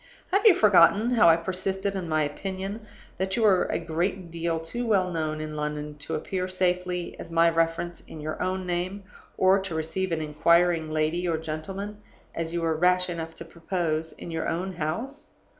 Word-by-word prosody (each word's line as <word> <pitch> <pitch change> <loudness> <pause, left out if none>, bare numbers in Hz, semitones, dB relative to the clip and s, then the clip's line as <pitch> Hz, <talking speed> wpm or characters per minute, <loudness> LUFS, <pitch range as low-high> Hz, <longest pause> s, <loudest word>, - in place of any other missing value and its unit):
Have 400 +4 +4
you 390 - +8
forgotten 210 +3 +5
how 225 -8 +6
I 165 - +7
persisted 190 +3 -2
in 185 -4 -4
my 155 -1 +2
opinion 195 +7 -5 0.3
that 190 0 -1
you 230 - +1
were 195 -4 +5
a - - -1
great 175 +2 -2
deal 165 0 -1
too 235 +10 -4
well 190 -4 +2
known 155 -2 -2
in 155 0 -5
London 150 0 -4
to 150 +3 -4
appear 185 +4 -2
safely 180 -1 -1
as - - -8
my 165 0 +4
reference 165 +1 -1
in 160 - -10
your 155 +1 -4
own 185 0 -1
name, 180 +3 -2 0.3
or 190 +1 +5
to 190 -4 -5
receive 160 +4 -2
an 165 - 0
inquiring 165 +2 +3
lady 155 +3 0
or 165 -2 +1
gentleman 190 +7 -5 0.4
(as 165 0 -3
you 170 0 -2
were 160 -1 +1
rash 180 +2 +3
enough 165 -1 -5
to 165 - -9
propose) 165 -1 -2
in 170 - -9
your 160 0 -2
own 185 +3 -2
house? 235 - -4
175 Hz, 190 wpm, -26 LUFS, 160-190 Hz, 0.4 s, you